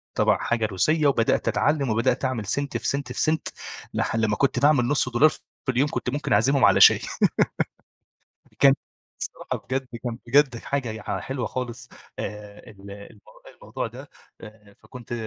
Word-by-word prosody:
تبع - - +3
حاجة 115 -2 -1
روسية 150 - +1
وبدأت 115 -5 +1
أتعلم، 145 -3 +1
وبدأت 120 +4 +1
أعمل 125 -5 -2
سنت 140 +7 -1
في - - -4
سنت 140 0 -2
في - - -3
سنت، 160 0 +1 0.5
لح - - -1
بعد 110 -1 +2
ما 105 0 0
كنت 135 -1 +1
باعمل 140 -2 +4
نص 140 -2 +1
دولار 130 +6 +5
في - - -9 0.3
اليوم 130 +4 +2
كنت 125 - -3
ممكن 140 0 -2
أعزمهم 135 +5 +4
على 100 -2 +4
شاي. - - +8 1.6
كان 140 -1 +7 0.5
الصراحة - - -5
بجد 130 0 -2 0.2
كان 120 -2 -4
بجد 135 0 +3
حاجة 135 0 -3
يع 110 -1 -4
حلوة 130 -2 -4
خالص 125 -1 -6 0.3
آه، 105 0 -8
ال 100 -1 -13
الم 100 +1 -12 0.4
الموضوع - - -4
ده. - - -12 0.7
فكنت 120 -2 -10
125 Hz, 160 wpm, -24 LUFS, 110-140 Hz, 1.6 s, شاي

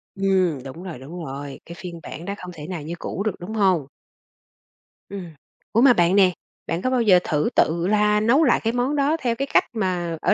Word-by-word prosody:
Ừm, 185 -8 +1
đúng 140 +7 -9
rồi, 170 -9 -7
đúng 165 +5 -8
rồi, 140 +1 -7
cái 170 - -9
phiên 175 -2 -7
bản 165 - -8
đó 200 - -3
không 180 0 -8
thể 150 -1 -9
nào 180 -5 -5
như 160 +4 -6
cũ 200 - -4
được, 215 -4 -1
đúng 190 +5 -7
hông? 190 -9 +2 1.2
Ừm. 190 -4 -7 0.4
Ủa, 230 - +3
mà 260 -2 +7
bạn 175 0 +3
nè, 190 -2 +6 0.4
bạn 165 +2 -2
có 255 - 0
bao 255 -2 +2
giờ 190 -5 +6
thử 150 -1 0
tự 170 +3 +2
la 210 0 +3
nấu 250 +9 +4
lại 250 - +4
cái 225 +1 0
món 250 +4 0
đó 290 +3 +2
theo 235 -2 0
cái 275 +2 -2
cách - - +6
mà 180 -6 -1
ở - - +3
185 Hz, 225 wpm, -23 LUFS, 170-220 Hz, 1.2 s, mà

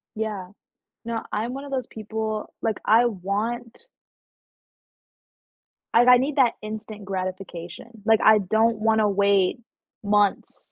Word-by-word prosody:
Yeah, 210 -4 -4 0.5
no, 230 -1 -3
I'm 225 +4 -2
one 275 +1 -6
of 285 - -9
those 260 -3 -2
people 220 0 -5
like, 220 -2 -1
I 230 +3 +5
want 230 - -4 2.1
like, 245 - +5
I 250 0 +9
need 275 +4 -2
that 255 -4 +4
instant 215 0 -7
gratification, 185 -1 -6 0.2
like, 220 0 +4
I 220 0 +7
don't 220 +3 +1
wanna 220 -1 +2
wait 200 +1 +2 0.4
months 205 -1 0
220 Hz, 125 wpm, -24 LUFS, 200-230 Hz, 2.1 s, I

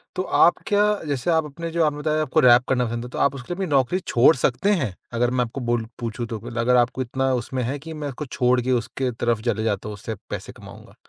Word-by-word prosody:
तो 185 - -1
आप 175 - +4
क्या 205 0 +3 0.2
जैसे 140 +3 -2
आप 160 -1 +2
अपने 165 +3 -6
जो 165 0 +1
आपने 145 -1 0
बताया 155 +1 0
आपको 155 +1 +1
रैप 125 -2 +6
करना 125 -2 +2
पसंद 120 +1 -4
है, - - -8
तो - - -8
आप 140 0 +2
उसके 135 +7 -6
लिए - - -5
अपनी 190 0 -2
नौकरी 135 +8 +2
छोड़ 135 -1 +4
सकते 130 +9 +1
हैं? 130 - 0 0.2
अगर 120 +1 +1
मैं 125 -1 +1
आपको 125 +4 -7
बोलूँ 120 -2 -1
पूछूँ 115 0 -4
तो 115 -2 -5 0.2
अगर 125 +2 +3
आपको 125 +1 +2
इतना 130 +1 -1
उसमें 125 +1 -2
है 130 +5 -2
कि 160 +2 -8
मैं 150 -2 -5
उसको 140 +2 -6
छोड़ 125 -1 +1
के 130 +2 -1
उसके 125 +2 -1
तरफ 115 -1 -1
चले 110 -2 0
जाता 105 -1 -2
हूँ - - -5
उससे 110 +2 -6
पैसे - - -6
कमाऊँगा? - - -14
125 Hz, 255 wpm, -23 LUFS, 120-150 Hz, 0.2 s, रैप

